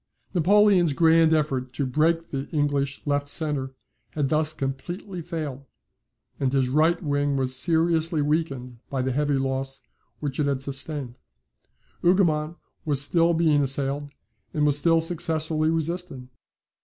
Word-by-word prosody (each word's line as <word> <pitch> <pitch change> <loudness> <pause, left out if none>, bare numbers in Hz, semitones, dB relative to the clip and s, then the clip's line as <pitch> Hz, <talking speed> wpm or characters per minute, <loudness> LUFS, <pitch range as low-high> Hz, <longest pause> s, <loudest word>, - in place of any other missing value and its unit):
Napoleon's 185 -2 +4
grand 165 +1 +4
effort 135 -5 0
to 140 +2 -2
break 165 +5 0
the 135 0 -4
English 145 -2 -1
left 145 0 0
centre 140 -4 -2 0.4
had 145 -3 -1
thus 155 +1 +1
completely 170 +7 -5
failed; 155 -5 -5 0.7
and 135 -2 0
his 135 -2 +1
right 160 +5 +2
wing 145 -1 0
was 130 -1 +1
seriously 165 +1 +1
weakened 140 -5 -2
by 135 -2 -2
the 130 - -1
heavy 145 +1 0
loss 135 0 -3 0.4
which 145 -2 -4
it 145 - +1
had 135 -1 -1
sustained. 135 -2 -3 0.8
Hougoumont 170 -3 +2 0.3
was 145 -4 +1
still 165 +4 +2
being 155 -3 +3
assailed, 140 +1 +1 0.5
and 150 -1 +2
was 145 -1 +4
still 165 +1 +3
successfully 160 -2 -1
resisting. 165 -5 -3
150 Hz, 135 wpm, -25 LUFS, 135-165 Hz, 0.8 s, Napoleon's